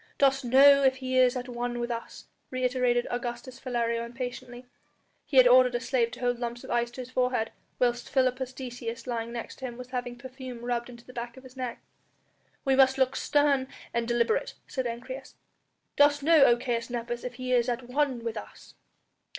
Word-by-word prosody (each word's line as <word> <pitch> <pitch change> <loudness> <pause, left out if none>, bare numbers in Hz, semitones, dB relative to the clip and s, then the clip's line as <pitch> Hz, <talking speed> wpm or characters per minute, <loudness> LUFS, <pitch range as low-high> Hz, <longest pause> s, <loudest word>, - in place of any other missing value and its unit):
"Dost 275 -1 +3
know 275 +3 +7
if 265 -1 +4
he 260 -1 -4
is 255 0 +5
at 250 0 -5
one 240 0 -3
with 240 0 -2
us?" 230 0 -6 0.2
reiterated 250 -1 +1
Augustus 245 +1 -5
Philario 235 -3 -1
impatiently. 245 +1 -7 0.6
He 280 - -1
had 255 -1 +9
ordered 250 0 +6
a - - +1
slave 240 -1 +1
to 250 - -9
hold 245 -1 0
lumps 240 0 -4
of - - -8
ice 240 0 +1
to 250 +2 -8
his 250 0 -10
forehead, 250 -3 0 0.3
whilst 240 -1 0
Philippus 255 -1 +1
Decius 245 -3 -6
lying 235 -2 -3
next 235 -1 -6
to 265 - -5
him 240 -2 -6
was 250 0 -9
having 245 -1 -4
perfume 255 -1 -9
rubbed 240 0 -2
into 235 -1 -13
the 255 - -13
back 235 0 -6
of 260 - -12
his 260 0 -14
neck. 250 -2 -5 0.8
"We 270 -1 +3
must 265 0 +5
look 260 0 +2
stern 285 -3 +2 0.3
and 235 -1 -1
deliberate," 240 - +1
said 260 -2 -2
Ancyrus. 255 +3 -7 0.6
"Dost 290 0 +5
know, 315 -2 +7
O 240 - +5
Caius 235 -1 -2
Nepos, 240 0 -4
if 250 -1 -5
he 255 0 -2
is 245 0 +3
at 245 +1 -2
one 260 -2 0
with 230 -1 -3
us?" - - -10
250 Hz, 195 wpm, -28 LUFS, 240-260 Hz, 0.8 s, had